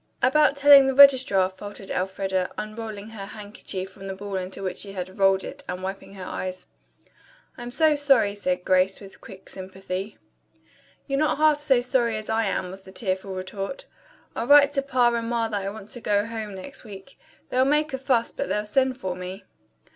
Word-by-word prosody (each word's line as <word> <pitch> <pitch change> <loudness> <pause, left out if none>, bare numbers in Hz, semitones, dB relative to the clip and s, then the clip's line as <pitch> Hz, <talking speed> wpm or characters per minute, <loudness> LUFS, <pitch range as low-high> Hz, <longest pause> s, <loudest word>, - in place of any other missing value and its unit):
"About 285 +2 +4
telling 280 -1 +8
the 270 - 0
registrar," 260 -9 +7
faltered 195 +1 -9
Elfreda, 190 0 -1
unrolling 215 -1 -6
her 205 -3 -8
handkerchief 205 -3 -6
from 195 +1 -10
the 190 - -5
ball 200 0 -6
into 185 +1 -4
which 185 - -4
she 200 -1 -6
had 185 0 -7
rolled 195 0 +4
it 280 0 -8
and 180 +1 -5
wiping 195 +1 -6
her 185 -1 -8
eyes. 185 0 -5 0.9
"I'm 240 -1 -7
so 305 +4 +3
sorry," 275 -8 +3 0.3
Grace 185 +1 +3
said - - -16
with 195 - -13
quick 190 -1 -13
sympathy. 190 +1 -6 0.9
"You're 275 -1 -1
not 305 -1 +1
half 305 -1 +3
so 270 -4 +3
sorry 240 -3 +1
as 215 - -7
I 225 0 +1
am," 185 -2 -2
was 190 +1 -9
the 190 - -14
tearful 190 -1 -3
retort. 195 +6 -5 0.5
"I'll 235 - -3
write 285 0 +7
to 280 -1 0
Pa 255 -3 +2
and 230 -1 -2
Ma 230 -1 0
that 205 -2 -2
I 195 - -3
want 210 0 -10
to 245 - -8
go 205 -1 +1
home 220 -3 -6
next 230 +9 -9
week. 210 +4 -12 0.3
They'll 255 +1 +3
make 300 +2 +1
a 265 - -2
fuss, 255 -3 +1
but 280 - -4
they'll 210 0 -1
send 260 +4 +1
for 185 -6 -4
me." 185 +2 -7
210 Hz, 195 wpm, -25 LUFS, 190-260 Hz, 0.9 s, telling